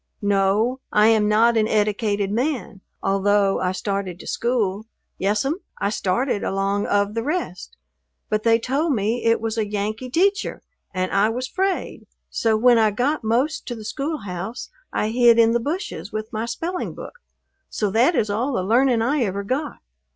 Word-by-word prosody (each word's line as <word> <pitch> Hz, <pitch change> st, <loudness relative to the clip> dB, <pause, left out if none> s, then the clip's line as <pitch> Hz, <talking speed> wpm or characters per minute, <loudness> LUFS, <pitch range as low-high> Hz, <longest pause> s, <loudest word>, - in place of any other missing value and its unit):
"No, 205 Hz, +5 st, +2 dB
I 210 Hz, +1 st, +5 dB
am 215 Hz, -2 st, +3 dB
not 230 Hz, +2 st, +4 dB
an 215 Hz, -1 st, +3 dB
eddicated 210 Hz, -2 st, 0 dB
man, 240 Hz, -4 st, -2 dB, 0.2 s
although 195 Hz, 0 st, +2 dB
I 180 Hz, -1 st, 0 dB
started 190 Hz, -1 st, -3 dB
to -, -, -11 dB
school. 220 Hz, -4 st, -1 dB, 0.3 s
Yes'm, 210 Hz, -, 0 dB, 0.2 s
I 200 Hz, -, -1 dB
started 210 Hz, +3 st, 0 dB
along 195 Hz, +1 st, -1 dB
of 205 Hz, 0 st, +1 dB
the 230 Hz, -, -1 dB
rest, 295 Hz, -, -4 dB, 0.5 s
but 215 Hz, 0 st, 0 dB
they 230 Hz, 0 st, +4 dB
told 275 Hz, +7 st, 0 dB
me 225 Hz, +2 st, -1 dB
it 230 Hz, 0 st, +3 dB
was 225 Hz, 0 st, -2 dB
a 215 Hz, -, 0 dB
Yankee 210 Hz, +4 st, -3 dB
teacher 395 Hz, -, 0 dB, 0.3 s
and 185 Hz, -1 st, -2 dB
I 200 Hz, +2 st, +3 dB
was 250 Hz, +3 st, -3 dB
'fraid, 380 Hz, +3 st, -2 dB, 0.2 s
so 225 Hz, -3 st, +1 dB
when 240 Hz, +1 st, +5 dB
I 220 Hz, -1 st, +4 dB
got 250 Hz, +8 st, -1 dB
most 255 Hz, +9 st, 0 dB
to 240 Hz, -, -4 dB
the 220 Hz, -2 st, -9 dB
schoolhouse 220 Hz, -, -5 dB, 0.2 s
I 215 Hz, -, -1 dB
hid 235 Hz, 0 st, +5 dB
in 230 Hz, -1 st, +5 dB
the 235 Hz, -, +2 dB
bushes 310 Hz, -, -4 dB
with 215 Hz, +2 st, -5 dB
my 220 Hz, +2 st, -2 dB
spelling 345 Hz, +9 st, -4 dB
book, 485 Hz, -, -10 dB, 0.5 s
so 210 Hz, -2 st, -1 dB
that 245 Hz, -, +3 dB
is 210 Hz, -5 st, +1 dB
all 245 Hz, +7 st, -1 dB
the 185 Hz, -, 0 dB
learning 235 Hz, +3 st, +3 dB
I 275 Hz, +4 st, +1 dB
ever 200 Hz, -3 st, -1 dB
got. 275 Hz, +8 st, -3 dB
220 Hz, 175 wpm, -22 LUFS, 205-250 Hz, 0.5 s, I